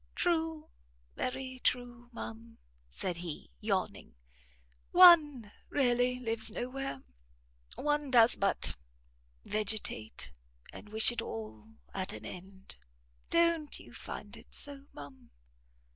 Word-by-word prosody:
"True, 325 -3 0 0.4
very 260 0 -4
true, 245 -1 -1
ma'am," 230 0 -8 0.3
said 175 - -3
he, 170 - -6
yawning, - - -2 0.7
"one 300 - +7 0.2
really 250 -2 +2
lives 225 -2 -1
no 240 +3 -4
where; 270 - -5 0.7
one 295 0 0
does 240 -2 +6
but 195 - +1 0.7
vegetate, 210 - -1 0.4
and 210 - -11
wish 220 +3 +5
it 240 - -3
all 110 - -8 0.2
at 190 -1 -2
an - - -9
end. 190 - -10 0.5
Don't 335 -3 +2
you - - -14
find - - -8
it - - -13
so, 285 -1 -6
ma'am?" 135 -3 -12
240 Hz, 110 wpm, -32 LUFS, 195-280 Hz, 0.7 s, one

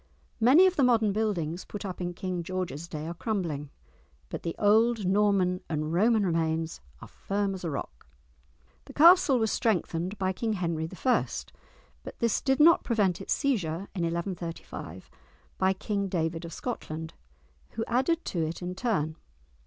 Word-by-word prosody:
Many 265 +11 +7
of 375 -1 +2
the 280 - +4
modern 225 -5 +3
buildings 185 -6 -1
put 205 -1 -7
up 185 -1 -5
in 175 0 -3
King 185 -1 -3
George's 170 -3 -4
day 155 -2 -6
are 170 - -4
crumbling, 170 -8 -3 0.6
but - - -5
the 165 - -4
old 220 +1 +3
Norman 190 -2 +2
and 155 0 -2
Roman 215 +3 +3
remains 160 - -1 0.2
are - - -9
firm 200 0 -2
as 185 - -7
a 170 - -2
rock! 60 - -6 0.8
The - - -12
castle 330 -3 +7
was 220 -2 +1
strengthened 185 -4 -1
by 190 -1 0
King 220 +3 -2
Henry 165 -4 -2 0.2
I., 250 - +4 0.8
but - - -10
this 235 -2 +1
did 265 0 +1
not 330 +3 +6
prevent 200 -6 +1
its - - 0
seizure 195 - -1
in 185 - -3
1135 170 - -5 0.5
by 190 0 +3
King 200 +1 -2
David 165 -2 -2
of 165 - -8
Scotland, 160 -10 -5 0.6
who 225 0 -2
added 265 +8 +1
to 170 -3 -1
it 160 +3 -4
in 180 +1 -3
turn. 165 -8 -1
185 Hz, 160 wpm, -28 LUFS, 165-220 Hz, 0.8 s, Many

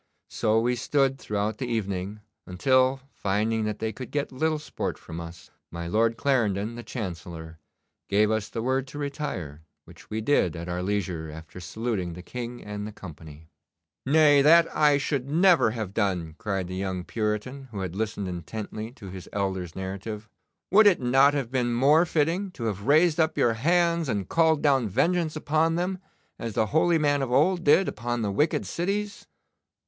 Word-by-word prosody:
So 110 +1 +2
we 120 +2 +1
stood 135 +2 +1
throughout 105 -1 -2
the 130 - -3
evening, 100 -2 -3 0.3
until, 130 +7 +2
finding 110 +3 0
that 105 0 -2
they 110 0 -2
could 125 +2 -8
get 145 -1 -2
little 155 +4 0
sport 150 - -4
from 85 0 -8
us, 85 -2 -11 0.2
my 85 0 -6
Lord 115 +5 +1
Clarendon, 115 -5 +1
the 120 - -7
Chancellor, 85 - -7 0.5
gave 105 +2 +3
us 110 -1 -1
the 115 - -4
word 130 +1 0
to 145 - -9
retire, 140 - -4 0.2
which - - -16
we 110 - -2
did 110 - +2
at 85 +1 -6
our 90 0 -3
leisure 90 -5 -2
after 80 +3 -10
saluting 95 0 -3
the 90 +1 -9
King 120 +2 -6
and 105 0 -5
the - - -7
company.' 80 -5 -12 0.5
'Nay, 145 0 +5
that 165 +3 +5
I 150 -2 +4
should 140 -1 -2
never 170 -3 +5
have 110 -4 -5
done!' 90 -7 -1
cried 95 -4 -2
the 90 - -6
young 95 -2 -3
Puritan, 110 +7 -3
who 105 -4 -6
had 90 -2 -4
listened 105 -2 -2
intently 105 +5 -6
to 100 -7 -10
his 95 -1 -9
elder's 95 -4 -3
narrative. 100 +3 -6 0.4
'Would 210 +2 +7
it 195 - +5
not 135 +3 +4
have 135 -4 -2
been 125 -2 0
more 150 +7 +4
fitting 165 +6 0
to 120 - -7
have 105 -1 -3
raised 160 +3 +4
up 160 -1 +2
your 115 - +3
hands 170 +4 +2
and 100 -5 -1
called 160 -2 +2
down 135 -6 +3
vengeance 165 - +1
upon 155 +2 +1
them, 180 +2 -2 0.4
as 115 -2 -4
the 110 - +2
holy 165 +2 +4
man 145 -2 +2
of 130 -2 -2
old 170 +7 +3
did 175 +5 +5
upon 120 +1 -3
the 100 - -1
wicked 150 +11 +1
cities? 200 +4 -3
115 Hz, 180 wpm, -26 LUFS, 95-145 Hz, 0.5 s, Would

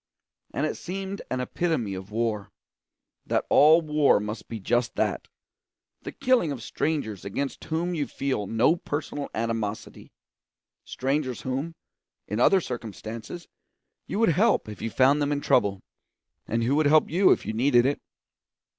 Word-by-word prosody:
And 145 - -1
it 155 - -3
seemed 195 +2 -5
an 130 - -1
epitome 125 - -1
of 95 +1 -7
war; 110 -2 -2 0.8
that - - 0
all 155 +3 +7
war 150 -6 +3
must 105 +1 -6
be 115 - -6
just 120 +4 0
that - - -1 0.7
the - - -6
killing 255 - +2
of 125 -5 -6
strangers 120 - -2
against 135 +8 -4
whom 170 +3 -1
you 150 -4 -1
feel 130 -8 -2
no 120 - +3
personal 145 -2 -4
animosity; 110 -2 -4 0.7
strangers 135 -1 -2
whom, 135 +6 -3 0.5
in 105 +2 -3
other 190 +9 +5
circumstances, 115 - -7 0.6
you - - -3
would 225 -2 +4
help 200 - +2
if 105 -2 -9
you 115 - -2
found 135 +5 +3
them 145 0 0
in 145 - 0
trouble, 100 -8 +2 0.7
and 115 +1 0
who 130 +5 +2
would 155 -1 +3
help 155 +1 +4
you 185 +4 +4
if - - +2
you 110 - -3
needed 120 +1 +3
it. 140 +2 0
135 Hz, 155 wpm, -26 LUFS, 115-155 Hz, 0.8 s, all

